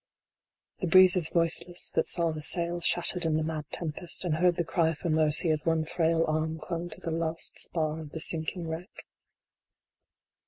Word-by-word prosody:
The 185 - -3
breeze 185 +2 +6
is 170 -4 +1
voiceless 170 +1 0
that - - -1
saw 170 -2 +5
the 155 -1 -7
sails 170 +2 0
shattered 175 +1 +3
in 160 -1 0
the 155 - -1
mad 155 -1 -5
tempest, 170 +2 -2
and 155 -3 -1
heard 175 +1 +2
the 175 - -2
cry 165 -1 0
for 170 +1 -4
mercy 155 +1 +3
as 155 -1 +1
one 165 -1 0
frail 165 0 0
arm 155 +1 -2
clung 170 +2 -6
to 160 - -8
the 165 - -5
last 165 0 -1
spar 155 -2 0
of 155 -2 -9
the 160 - -8
sinking 165 +2 -1
wreck. 165 +6 -8
165 Hz, 185 wpm, -27 LUFS, 155-175 Hz, -, breeze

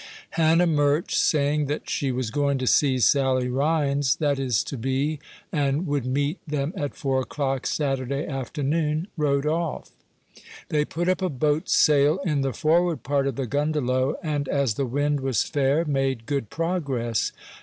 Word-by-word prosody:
Hannah 165 +1 +3
Murch, 150 -1 +1
saying 150 -1 +2
that 150 +2 -4
she 135 -2 -1
was 125 -3 -2
going 140 0 +1
to 130 - -3
see 135 +1 +3
Sally 130 0 +2
Rhines, 140 0 +1
that 145 -3 0
is 125 -5 +1
to - - -6
be, 135 +5 -1 0.3
and 145 +2 0
would 145 -5 -1
meet 145 +6 -1
them 150 +2 -2
at 145 -1 -3
four 135 -2 0
o'clock 135 -1 -2
Saturday 140 0 -1
afternoon, 150 - -2
rode 140 -2 +1
off. 160 -1 -2 0.8
They 150 -1 +1
put 175 +3 -3
up 185 0 +1
a 185 - 0
boat's 150 +2 0
sail 150 +2 +4
in 150 -5 +1
the 135 -1 0
forward 165 +6 +1
part 140 0 0
of 135 - -2
the 135 - -2
"gundelow," 140 -1 0
and, 145 -3 -2
as 140 -5 +1
the 135 +4 -2
wind 145 +3 0
was 135 -2 0
fair, 145 +2 +1
made 135 -5 -1
good 140 -6 -2
progress. 140 - -1
145 Hz, 165 wpm, -24 LUFS, 135-150 Hz, 0.8 s, sail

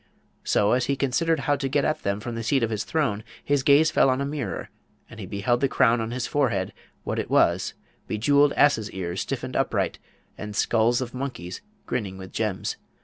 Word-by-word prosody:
So, 105 - +2
as 125 0 +2
he 140 - +1
considered 140 +4 +1
how 145 +2 +2
to 135 -1 -2
get 140 +1 +1
at 155 - 0
them 100 +1 -1
from 120 +1 -5
the 115 - -4
seat 130 +3 +1
of 115 - 0
his 105 -1 -2
throne, 120 -10 0 0.2
his 145 -1 +1
gaze 150 +3 +5
fell 135 - +4
on 130 0 +1
a 140 - -1
mirror, 140 - -4 0.4
and - - -12
he - - -6
beheld 120 +5 0
the 135 - +4
crown 120 -3 +3
on 110 - -3
his 120 0 -3
forehead 115 -10 0 0.3
what - - -2
it - - -3
was, - - +2 0.3
bejewelled 140 +6 +3
asses' 115 -7 +3
ears 90 -1 -3
stiffened - - -4
upright, - - 0 0.4
and 105 0 -6
skulls 115 +3 +2
of 125 -2 -5
monkeys 125 -9 -5 0.2
grinning 100 -5 -3
with 95 -1 -9
gems! 105 -4 -2
120 Hz, 200 wpm, -25 LUFS, 105-140 Hz, 0.4 s, gaze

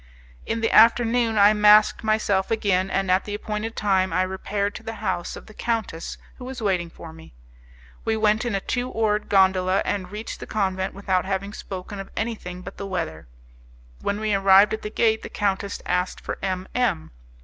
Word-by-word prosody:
In 225 0 -1
the 225 - +1
afternoon 230 0 +4
I 205 +1 +7
masked 210 +1 +5
myself 215 -3 +1
again, 195 -4 +1
and 195 -1 0
at 185 +1 +2
the 205 - -4
appointed 215 +2 -4
time 190 -3 +1
I 180 +3 +2
repaired 200 +2 -2
to - - -8
the 225 - -6
house 190 -5 -3
of - - -11
the 215 - -14
countess 220 -8 -3 0.2
who 250 - -9
was 260 0 -6
waiting 185 -6 0
for 165 -1 -11
me. 160 - -15 0.7
We 220 0 0
went 215 +1 +2
in 240 -4 -1
a - - +1
two 245 +4 -2
oared 215 -2 0
gondola, 190 -1 +3
and 190 -3 -2
reached 210 +2 -6
the - - -8
convent 190 -3 -1
without 190 -2 0
having 195 +1 -3
spoken 195 0 -7
of 195 - -7
anything 195 -5 -4
but - - -9
the 200 - -5
weather. 165 - -4 0.7
When 200 +1 -1
we 215 -1 0
arrived 195 +1 +6
at 220 - -3
the 210 - -5
gate, 220 0 +1
the - - -8
countess 200 -1 -2
asked 180 +1 -1
for - - -6
M 185 -1 -2
M 80 - 0
200 Hz, 195 wpm, -24 LUFS, 190-220 Hz, 0.7 s, I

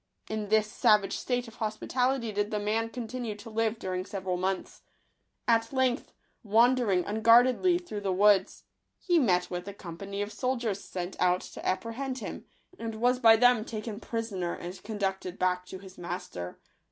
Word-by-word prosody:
In 215 -2 -3
this 215 0 +4
savage 210 -2 +3
state 245 -1 -2
of 225 +1 -13
hospitality 235 +2 -1
did 205 0 -1
the 215 - -1
man 220 +2 0
continue 235 -2 -5
to 210 +2 -11
live 225 +1 0
during 185 -3 -3
several 190 -2 -3
months. 185 +1 -3 0.7
At 230 -1 +3
length, 260 -1 0 0.3
wandering 225 -3 +3
unguardedly 240 - +5
through 350 -13 -6
the 195 -1 -1
woods, 200 +1 +3 0.3
he 350 -2 +2
met 180 - +2
with 180 +1 -4
a 200 - -6
company 195 +2 -5
of 205 - -6
soldiers 235 -4 -1
sent 180 0 -5
out 180 0 +3
to - - -10
apprehend 230 +7 -2
him, 245 - -6 0.3
and 225 -1 -4
was 245 +3 +2
by 225 -3 +8
them 245 -1 +5
taken 215 -1 -5
prisoner 210 -8 -3
and 180 +2 -8
conducted 195 -3 -3
back 180 0 0
to 190 - -7
his 190 0 -13
master. 170 - -6
215 Hz, 165 wpm, -29 LUFS, 190-235 Hz, 0.7 s, by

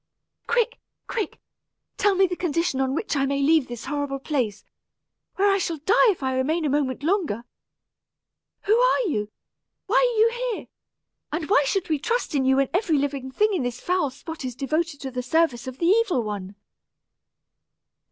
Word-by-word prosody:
"Quick 475 +1 +1 0.3
quick! 440 -4 -4 0.6
tell 410 -1 +3
me 385 +1 +5
the 360 -1 -2
condition 335 -5 0
on 265 0 0
which 330 -1 -2
I 275 -1 +1
may 280 0 0
leave 300 0 +3
this 240 -1 -7
horrible 285 -1 -2
place, 260 -7 -2 0.7
where 400 +1 +3
I 395 - +2
shall 335 -3 -2
die 395 - +4
if 360 -9 -1
I 260 0 0
remain 310 +6 0
a 290 - +1
moment 280 -1 -1
longer. 320 - 0 1.2
Who 425 - +3
are - - +4
you? 215 - -1 0.6
why 445 +5 +2
are - - +3
you 475 +2 +2
here? - - -9 0.6
and 310 0 -3
why 285 - +5
should 390 +2 0
we 310 -2 0
trust 465 - -1
in 270 -2 +1
you 265 0 +4
when 275 -1 +2
every 355 -5 +2
living 275 -2 -2
thing 420 +10 +1
in 360 - 0
this 245 -1 -3
foul 360 -5 0
spot 300 +4 -8
is 250 -2 -4
devoted 305 +3 -2
to 265 -1 -5
the 250 0 -3
service 260 -2 +1
of 260 0 -6
the 335 - -1
evil 385 - +3
one?" 200 -2 -5
300 Hz, 180 wpm, -24 LUFS, 265-385 Hz, 1.2 s, me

